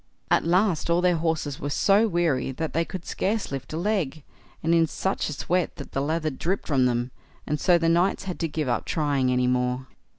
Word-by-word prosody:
At -, -, +4 dB
last 175 Hz, 0 st, +2 dB
all 170 Hz, +1 st, +3 dB
their 180 Hz, -1 st, +3 dB
horses 160 Hz, -3 st, -1 dB
were 145 Hz, -, -3 dB
so 200 Hz, +9 st, +3 dB
weary 165 Hz, -9 st, 0 dB
that 160 Hz, +4 st, -4 dB
they 165 Hz, -, +2 dB
could 180 Hz, 0 st, -7 dB
scarce 210 Hz, -2 st, -1 dB
lift 135 Hz, -1 st, -5 dB
a 155 Hz, -, -3 dB
leg, 170 Hz, -6 st, -1 dB, 0.4 s
and 165 Hz, +1 st, +2 dB
in 165 Hz, -1 st, +4 dB
such 190 Hz, +3 st, -2 dB
a -, -, -3 dB
sweat 175 Hz, +5 st, -1 dB
that 140 Hz, -, -9 dB
the 135 Hz, -, -1 dB
lather 155 Hz, +2 st, -1 dB
dripped 175 Hz, +8 st, -2 dB
from 130 Hz, -4 st, +3 dB
them, 120 Hz, +1 st, -1 dB, 0.3 s
and 150 Hz, 0 st, -2 dB
so 175 Hz, +1 st, +4 dB
the 165 Hz, -1 st, 0 dB
knights 175 Hz, +5 st, +2 dB
had 185 Hz, -2 st, -5 dB
to 165 Hz, -, 0 dB
give 155 Hz, -2 st, -3 dB
up 120 Hz, -2 st, -1 dB
trying 140 Hz, -5 st, +1 dB
any 125 Hz, 0 st, +2 dB
more. 125 Hz, +1 st, 0 dB
160 Hz, 220 wpm, -25 LUFS, 135-175 Hz, 0.4 s, At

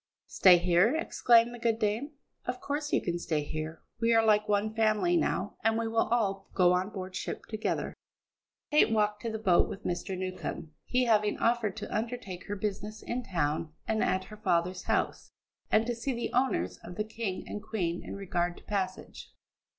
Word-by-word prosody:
"Stay 185 Hz, -2 st, +6 dB
here?" 180 Hz, -, +3 dB
exclaimed 240 Hz, -7 st, +4 dB
the 240 Hz, -, -8 dB
good 230 Hz, -1 st, +1 dB
dame. 225 Hz, +7 st, -1 dB, 0.3 s
"Of 250 Hz, 0 st, -3 dB
course 290 Hz, +2 st, -3 dB
you -, -, +2 dB
can 175 Hz, -1 st, -1 dB
stay 155 Hz, -3 st, -1 dB
here. 155 Hz, +2 st, -5 dB, 0.2 s
We 230 Hz, 0 st, +3 dB
are 225 Hz, 0 st, +5 dB
like 210 Hz, 0 st, +3 dB
one 210 Hz, +1 st, +1 dB
family 220 Hz, +10 st, +2 dB
now, 335 Hz, -, 0 dB
and 225 Hz, 0 st, +3 dB
we 230 Hz, 0 st, -1 dB
will 225 Hz, 0 st, +1 dB
all 195 Hz, -5 st, 0 dB
go 180 Hz, -2 st, +5 dB
on 185 Hz, +2 st, 0 dB
board 185 Hz, -3 st, -7 dB
ship 180 Hz, -, -4 dB
together." 215 Hz, 0 st, -2 dB, 0.8 s
Kate 300 Hz, -, +5 dB
walked 210 Hz, -1 st, +1 dB
to 230 Hz, -, -2 dB
the 220 Hz, -, -3 dB
boat 190 Hz, -5 st, +3 dB
with -, -, -7 dB
Mr. 180 Hz, +2 st, -2 dB
Newcombe, 185 Hz, -4 st, -5 dB
he 255 Hz, 0 st, +2 dB
having 210 Hz, -3 st, +3 dB
offered 230 Hz, -4 st, +1 dB
to -, -, -5 dB
undertake 220 Hz, -5 st, -4 dB
her 205 Hz, -, -2 dB
business 210 Hz, +1 st, -4 dB
in 245 Hz, +1 st, -2 dB
town 155 Hz, -6 st, -1 dB
and 220 Hz, -1 st, +1 dB
at 185 Hz, 0 st, +1 dB
her 215 Hz, +3 st, -11 dB
father's 180 Hz, -2 st, 0 dB
house, -, -, -1 dB, 0.4 s
and 220 Hz, +1 st, +4 dB
to 240 Hz, -, -1 dB
see 240 Hz, +3 st, -3 dB
the 235 Hz, -, -3 dB
owners 255 Hz, +2 st, +1 dB
of 175 Hz, -, -10 dB
the 210 Hz, -, -1 dB
King 215 Hz, -3 st, -4 dB
and 210 Hz, -, -5 dB
Queen 175 Hz, -6 st, -2 dB
in -, -, -6 dB
regard 175 Hz, -3 st, -1 dB
to -, -, -15 dB
passage. 190 Hz, -2 st, -4 dB
210 Hz, 190 wpm, -30 LUFS, 185-230 Hz, 0.8 s, Stay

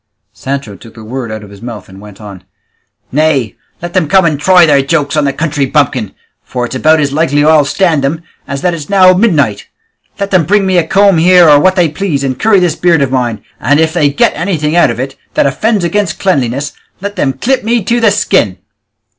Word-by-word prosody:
Sancho 135 Hz, -6 st, -5 dB
took 115 Hz, +4 st, -16 dB
the 110 Hz, -, -12 dB
word 120 Hz, +1 st, -6 dB
out 110 Hz, -1 st, -7 dB
of 100 Hz, -, -13 dB
his 100 Hz, 0 st, -14 dB
mouth 115 Hz, -5 st, -8 dB
and 95 Hz, +1 st, -14 dB
went 105 Hz, -2 st, -14 dB
on, 100 Hz, -4 st, -11 dB, 0.7 s
"Nay, 145 Hz, -5 st, 0 dB, 0.3 s
let 175 Hz, 0 st, -6 dB
them 180 Hz, -5 st, 0 dB
come 190 Hz, +3 st, +3 dB
and 155 Hz, -4 st, 0 dB
try 180 Hz, +2 st, +5 dB
their 145 Hz, -3 st, +3 dB
jokes 145 Hz, +1 st, -1 dB
on 150 Hz, -1 st, +1 dB
the 140 Hz, -, 0 dB
country 145 Hz, -1 st, -2 dB
bumpkin, 130 Hz, -8 st, -1 dB, 0.3 s
for 125 Hz, -1 st, -4 dB
it's 120 Hz, -, -8 dB
about 155 Hz, +4 st, +2 dB
as 140 Hz, -2 st, -1 dB
likely 145 Hz, -1 st, +1 dB
I'll 155 Hz, -2 st, +4 dB
stand 160 Hz, -2 st, 0 dB
them 155 Hz, +4 st, -2 dB, 0.2 s
as 140 Hz, -1 st, -5 dB
that 180 Hz, -1 st, +1 dB
it's 155 Hz, -4 st, -7 dB
now 185 Hz, -2 st, +5 dB
midnight! 150 Hz, -, 0 dB, 0.5 s
Let 200 Hz, 0 st, -3 dB
them 185 Hz, -4 st, +2 dB
bring 200 Hz, +3 st, +1 dB
me 185 Hz, -2 st, +2 dB
a 160 Hz, -, -2 dB
comb 195 Hz, -1 st, +3 dB
here, 175 Hz, 0 st, +5 dB
or 145 Hz, -1 st, +6 dB
what 185 Hz, +4 st, +2 dB
they 175 Hz, -3 st, +2 dB
please, 150 Hz, -2 st, -3 dB
and 130 Hz, -2 st, -3 dB
curry 215 Hz, -3 st, +3 dB
this 180 Hz, -3 st, 0 dB
beard 170 Hz, -5 st, +2 dB
of 130 Hz, -, -3 dB
mine, 120 Hz, -5 st, -2 dB, 0.2 s
and 145 Hz, +4 st, +1 dB
if 160 Hz, 0 st, +1 dB
they 150 Hz, -5 st, +2 dB
get 140 Hz, -, +1 dB
anything 160 Hz, -2 st, -2 dB
out 175 Hz, -, +4 dB
of 115 Hz, 0 st, -4 dB
it 135 Hz, +1 st, -5 dB, 0.2 s
that -, -, +2 dB
offends 210 Hz, +8 st, 0 dB
against 175 Hz, 0 st, -1 dB
cleanliness, 140 Hz, -6 st, -1 dB, 0.3 s
let 200 Hz, +1 st, -6 dB
them 135 Hz, -2 st, -1 dB
clip 255 Hz, -, -1 dB
me 230 Hz, 0 st, 0 dB
to 235 Hz, +5 st, 0 dB
the 225 Hz, -2 st, +3 dB
skin." 195 Hz, -, 0 dB
150 Hz, 225 wpm, -11 LUFS, 135-180 Hz, 0.7 s, or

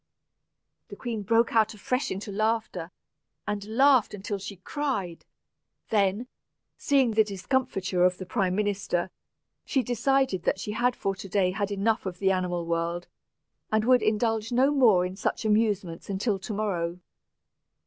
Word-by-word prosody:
The -, -, -9 dB
queen 230 Hz, -4 st, -4 dB
broke 230 Hz, +3 st, +2 dB
out 220 Hz, 0 st, +3 dB
afresh 250 Hz, +6 st, -1 dB
into 200 Hz, +2 st, -5 dB
laughter, 215 Hz, -5 st, -1 dB, 0.6 s
and 210 Hz, -1 st, -2 dB
laughed 255 Hz, -1 st, +4 dB
until 205 Hz, 0 st, -4 dB
she 200 Hz, +1 st, -7 dB
cried. 200 Hz, -, -3 dB, 0.7 s
Then, 205 Hz, +2 st, +2 dB, 0.5 s
seeing 270 Hz, -4 st, +2 dB
the 220 Hz, 0 st, +4 dB
discomfiture 195 Hz, -2 st, -1 dB
of 180 Hz, 0 st, +3 dB
the 185 Hz, -, -7 dB
prime 185 Hz, 0 st, 0 dB
minister, 195 Hz, -3 st, -1 dB, 0.5 s
she 265 Hz, -3 st, 0 dB
decided 245 Hz, -4 st, +1 dB
that 190 Hz, -, 0 dB
she 210 Hz, -, -4 dB
had 240 Hz, +3 st, +1 dB
for 195 Hz, -, -1 dB
to 195 Hz, 0 st, -9 dB
day 185 Hz, -1 st, +2 dB
had 200 Hz, +1 st, -2 dB
enough 205 Hz, +1 st, 0 dB
of 180 Hz, -1 st, -5 dB
the 195 Hz, 0 st, +2 dB
animal 180 Hz, -2 st, -1 dB
world, 170 Hz, +1 st, -2 dB, 0.6 s
and 215 Hz, 0 st, +2 dB
would 250 Hz, 0 st, +5 dB
indulge 220 Hz, +1 st, 0 dB
no 260 Hz, +4 st, +3 dB
more 225 Hz, -11 st, +4 dB
in 180 Hz, +1 st, -5 dB
such 215 Hz, -, -2 dB
amusements 210 Hz, -6 st, 0 dB
until 200 Hz, +1 st, -1 dB
to 205 Hz, -, -7 dB
morrow. 180 Hz, -5 st, -2 dB
205 Hz, 150 wpm, -27 LUFS, 185-230 Hz, 0.7 s, would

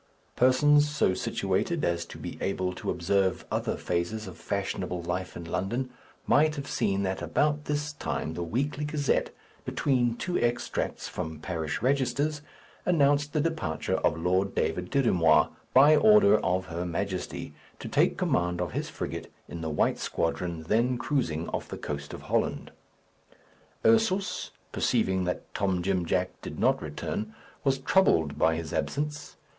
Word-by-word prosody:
Persons 145 Hz, +4 st, +5 dB
so 150 Hz, -10 st, +2 dB
situated 100 Hz, -, -1 dB
as 85 Hz, 0 st, 0 dB
to -, -, -10 dB
be -, -, -6 dB
able 95 Hz, -2 st, -1 dB
to -, -, -5 dB
observe 95 Hz, +1 st, +1 dB
other -, -, -1 dB
phases 90 Hz, +6 st, -2 dB
of 95 Hz, -, -8 dB
fashionable 90 Hz, -1 st, -3 dB
life 90 Hz, +2 st, -3 dB
in 85 Hz, -, -7 dB
London, 100 Hz, +10 st, -2 dB, 0.3 s
might 155 Hz, +1 st, +4 dB
have 140 Hz, -2 st, -5 dB
seen 100 Hz, 0 st, 0 dB
that 95 Hz, 0 st, -2 dB
about 150 Hz, 0 st, +1 dB
this 145 Hz, 0 st, -2 dB
time 80 Hz, -, -3 dB
the 85 Hz, -, -4 dB
Weekly 135 Hz, -, -1 dB
Gazette, 150 Hz, -1 st, 0 dB, 0.3 s
between 120 Hz, -4 st, +1 dB
two 180 Hz, +7 st, -1 dB
extracts 120 Hz, 0 st, -1 dB
from 80 Hz, -3 st, -5 dB
parish 80 Hz, -1 st, -3 dB
registers, 140 Hz, +3 st, +1 dB, 0.4 s
announced 145 Hz, -4 st, +3 dB
the 150 Hz, -, +1 dB
departure 155 Hz, -, -1 dB
of 80 Hz, -, +1 dB
Lord 90 Hz, +4 st, +1 dB
David 90 Hz, +3 st, -1 dB
Dirry 135 Hz, -4 st, +2 dB
Moir, 80 Hz, -3 st, +4 dB, 0.2 s
by 145 Hz, +4 st, +7 dB
order 210 Hz, +2 st, +6 dB
of 95 Hz, +1 st, 0 dB
her 85 Hz, 0 st, -4 dB
Majesty, 90 Hz, +2 st, -3 dB, 0.2 s
to -, -, -7 dB
take -, -, +2 dB
command 90 Hz, 0 st, +1 dB
of 90 Hz, -3 st, -2 dB
his -, -, -3 dB
frigate -, -, -5 dB, 0.2 s
in 85 Hz, -, -7 dB
the 80 Hz, -, -2 dB
white 75 Hz, -, +1 dB
squadron 85 Hz, 0 st, -2 dB
then 120 Hz, +8 st, +2 dB
cruising 115 Hz, -, -1 dB
off -, -, -3 dB
the -, -, -6 dB
coast 70 Hz, -1 st, -5 dB
of -, -, -8 dB
Holland. -, -, -1 dB, 1.1 s
Ursus, 220 Hz, -4 st, +2 dB, 0.2 s
perceiving 95 Hz, -1 st, +1 dB
that 90 Hz, -, -4 dB
Tom 95 Hz, -4 st, 0 dB
Jim 90 Hz, -2 st, 0 dB
Jack 90 Hz, +2 st, +1 dB
did -, -, -7 dB
not -, -, +2 dB
return, 110 Hz, +1 st, -4 dB, 0.3 s
was 135 Hz, -1 st, +2 dB
troubled 130 Hz, -, +3 dB
by 80 Hz, 0 st, +4 dB
his 80 Hz, 0 st, -5 dB
absence. 150 Hz, -, -3 dB
100 Hz, 155 wpm, -28 LUFS, 85-145 Hz, 1.1 s, by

